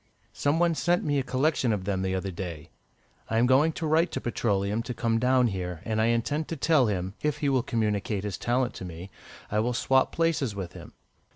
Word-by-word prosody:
Some 145 +2 +1
one 170 0 +3
sent 175 +2 +1
me 145 -3 +1
a - - -1
collection 135 -1 +1
of 100 -3 -1
them 95 -2 -1
the 95 0 -1
other 95 +1 -3
day. 85 -3 -7 0.6
I 110 - 0
am 120 - +4
going 135 +6 +4
to 165 - -4
write 160 +3 +3
to - - -1
Petroleum 105 -2 0
to 120 +1 -5
come 115 -1 +1
down 125 +1 +3
here, 90 -6 -3
and 110 -1 0
I - - +3
intend 135 +7 0
to 165 - -4
tell 145 -4 +3
him, 95 -2 -2
if 150 -1 0
he 145 -1 0
will 130 -2 +2
communicate 105 -4 -1
his 105 -4 -4
talent 125 +1 0
to - - -7
me, 90 +2 -8 0.4
I 105 - +1
will 120 +3 0
swap 130 +2 +2
places 160 -9 0
with 95 -3 -5
him." - - -11
115 Hz, 220 wpm, -27 LUFS, 100-140 Hz, 0.6 s, am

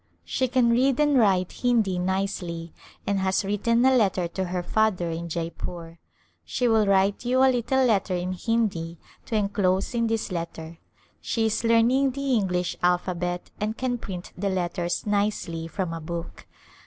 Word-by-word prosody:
She 260 - 0
can 245 -1 +3
read 255 +3 +2
and 295 -1 +3
write 190 -7 +3
Hindi 225 -7 +1
nicely 180 -3 -2 0.3
and 200 -1 0
has 190 +1 +1
written 230 +4 +2
a 265 0 +5
letter 190 -6 +2
to 190 +2 -3
her 180 0 -3
father 185 -4 +1
in 170 +1 -5
Jeypore. 165 0 -5 0.4
She 250 - -1
will 220 -2 +3
write 195 +2 +2
you 255 +2 +3
a 265 -1 +5
little 260 +2 +1
letter 200 -5 +1
in 180 +1 -2
Hindi 185 -5 -1 0.3
to 225 - -2
enclose 200 -1 +1
in 230 -1 +1
this 225 -2 -2
let 170 -1 -4
ter. 160 +1 -9 0.4
She 225 -1 0
is 220 +1 0
learning 240 +4 +3
the 275 0 -1
English 180 -5 0
alphabet 180 0 -1
and 215 +2 -2
can 250 -2 -1
print 180 -5 -7
the 200 +2 -1
letters 175 -1 -2
nicely 200 -5 -1
from 180 0 -3
a 165 - -5
book. 165 - -7
195 Hz, 165 wpm, -25 LUFS, 175-230 Hz, 0.4 s, a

